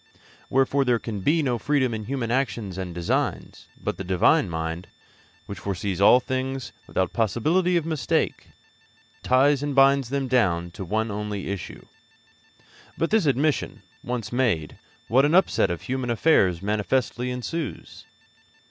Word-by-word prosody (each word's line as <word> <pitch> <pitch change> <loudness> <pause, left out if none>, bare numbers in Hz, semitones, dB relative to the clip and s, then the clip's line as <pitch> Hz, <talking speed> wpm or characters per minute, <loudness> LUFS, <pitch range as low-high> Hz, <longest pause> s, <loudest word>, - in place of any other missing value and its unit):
Wherefore 135 +1 +2
there 125 -2 +2
can 110 -3 -5
be 155 - +2
no 125 -4 0
freedom 130 -3 +1
in 110 -1 -5
human 125 -2 -3
actions 120 -7 -1
and 95 -2 -5
designs; 85 0 -2
but - - -3
the 95 - -5
Divine 90 -1 +3
mind, 80 +2 -4 0.6
which 100 -2 -8
foresees 95 -1 -3
all 120 +5 +7
things 130 0 -3 0.2
without 95 -2 -1
possibility 155 - +1
of 165 - -1
mistake, 160 -4 -1 0.7
ties 135 +2 +3
and 145 -1 -3
binds 135 -2 +4
them 140 0 -1
down 90 -9 +1
to 95 - -7
one 110 +4 -1
only 105 -1 -4
issue. 100 -2 -6 1.1
But 165 - -1
this 215 -7 +3
admission 140 0 0 0.2
once 120 -3 -4
made, 110 - -1 0.3
what 130 +5 +4
an 150 +4 +3
upset 190 0 +3
of 85 -1 -4
human 130 -1 -3
affairs 95 - +2
manifestly 115 +4 -1
ensues! 125 +3 -5
120 Hz, 145 wpm, -24 LUFS, 100-135 Hz, 1.1 s, all